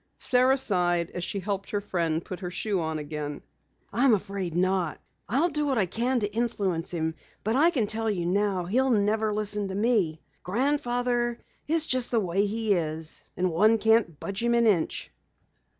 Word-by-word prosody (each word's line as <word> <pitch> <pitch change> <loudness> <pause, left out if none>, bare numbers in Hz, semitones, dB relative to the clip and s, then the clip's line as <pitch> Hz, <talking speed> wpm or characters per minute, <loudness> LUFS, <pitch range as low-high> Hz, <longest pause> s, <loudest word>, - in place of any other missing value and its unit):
Sara 255 +1 +3
sighed 175 -7 +1
as 175 - -5
she 200 - -3
helped 195 0 -3
her 205 - -1
friend 170 -5 -1
put 185 - -6
on - - -20
her 180 - -3
shoe 185 0 -1
again. 150 -2 -4 0.5
"I'm 240 +1 +4
afraid 195 -4 -4
not. 185 -2 0 0.3
I'll 280 +10 +2
do 300 -2 -1
what 265 -3 +1
I 205 - +3
can 240 +7 0
to 205 0 -2
influence 200 -8 -1
him, 160 -2 -2 0.3
but 220 +3 0
I 310 +5 +5
can 265 -11 +1
tell 220 +1 -1
you 180 -5 -1
now 190 0 0
he'll 255 +9 +1
never 215 -1 +2
listen 210 -1 0
to 190 - -5
me. 200 -8 +1 0.2
Grandfather 245 +1 0 0.3
is 320 +1 +2
just 255 -4 +1
the 235 - +2
way 195 +1 +1
he 220 0 0
is, 160 -2 -2 0.2
and 180 0 +1
one 215 +7 +4
can't 220 -8 +2
budge 195 +1 -4
him 235 0 +2
an 235 0 +3
inch." 190 -7 +1
205 Hz, 180 wpm, -27 LUFS, 180-235 Hz, 0.5 s, I